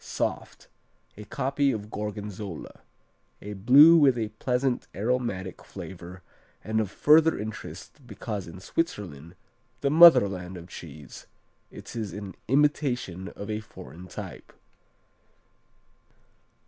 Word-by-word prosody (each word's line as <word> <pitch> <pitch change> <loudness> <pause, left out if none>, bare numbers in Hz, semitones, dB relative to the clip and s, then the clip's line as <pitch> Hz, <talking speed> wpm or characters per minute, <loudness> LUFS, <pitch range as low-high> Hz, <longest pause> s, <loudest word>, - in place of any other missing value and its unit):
Soft. - - -4 0.5
A 105 - -10
copy 140 +4 0
of 105 -2 -6
Gorgonzola. 105 -3 -6 0.6
A 105 - -7
Blue 135 +11 +7
with 135 -5 +5
a 110 -2 -2
pleasant, 125 +4 -1
aromatic 105 -3 -2
flavor, 90 0 -10 0.4
and 110 0 0
of 105 - -3
further 155 +9 +4
interest 110 +5 -8
because 105 -7 -5
in 85 +2 -10
Switzerland, 90 - -4 0.5
the 140 - +1
motherland 100 - +6
of 85 +1 -11
cheese, 75 -5 -11 0.4
it - - -11
is 110 -6 -4
an 100 -2 -7
imitation 125 - 0
of 100 - -7
a 105 - -2
foreign 90 -4 -12
type. - - -9
105 Hz, 110 wpm, -27 LUFS, 95-130 Hz, 0.6 s, Blue